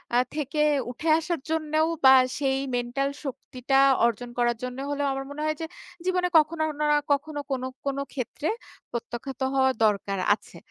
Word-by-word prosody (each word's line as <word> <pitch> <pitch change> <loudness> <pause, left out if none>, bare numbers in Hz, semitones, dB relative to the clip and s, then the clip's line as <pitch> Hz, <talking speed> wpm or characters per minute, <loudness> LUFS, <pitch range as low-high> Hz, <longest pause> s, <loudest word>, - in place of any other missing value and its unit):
আ - - +5 0.2
থেকে 300 0 -1 0.3
উঠে 315 +6 -3
আসার 335 -1 -2
জন্যও 315 0 +1 0.2
বা 265 0 +10 0.2
সেই 270 -2 +1 0.2
মেন্টাল 245 +3 -1 0.2
শক্তিটা 265 0 -1 0.3
অর্জন 235 +1 -1
করার 240 -1 +2
জন্য 250 0 -4
হলেও 285 0 0
আমার 270 0 -4
মনে 300 - -6
হয় 310 0 0
যে, - - -1 0.4
"জীবনে 365 -1 +1
কখনো 315 +1 +2
উনারা 295 0 +2 0.2
কখনো 290 +1 -3
না - - -13
কোন, 260 -1 -1 0.2
কোন 275 -1 -1 0.2
ক্ষেত্রে 280 +4 -3 0.4
প্রত্যাখ্যাত 240 +3 -6
হওয়া 265 0 +4
দরকার 200 -2 0 0.2
আছে।" - - -16
275 Hz, 160 wpm, -26 LUFS, 250-305 Hz, 0.4 s, বা